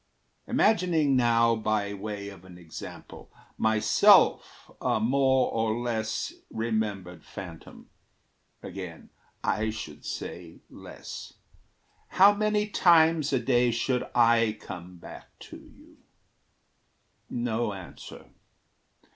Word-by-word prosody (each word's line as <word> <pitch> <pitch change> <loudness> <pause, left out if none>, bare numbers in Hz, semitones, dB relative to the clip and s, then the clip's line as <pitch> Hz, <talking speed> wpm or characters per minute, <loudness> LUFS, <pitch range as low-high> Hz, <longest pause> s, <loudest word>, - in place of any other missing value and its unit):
Imagining 170 -9 +2
now, 115 -2 +3
by 110 -2 -1
way 100 0 -6
of 95 -3 -13
an 90 -1 -13
example, 85 -3 -11 0.3
Myself 110 -1 +3
a - - +1
more 130 +3 +2
or 110 0 0
less 115 -2 -3 0.2
remembered 105 -7 -3
phantom 90 -5 -11 0.8
Again, 90 -3 -9 0.3
I 110 +1 0
should 80 -9 -8
say 85 -2 -7
less - - -10 0.7
how 200 +2 +6
many 210 0 0
times 165 -6 +4
A 135 - +2
day 120 0 +2
should 125 +2 0
I 115 -2 +3
come 90 -2 -9
back - - -13
to - - -10
you? - - -19 1.3
No 120 -2 -2
answer. 95 -3 -11
110 Hz, 100 wpm, -27 LUFS, 100-130 Hz, 1.3 s, how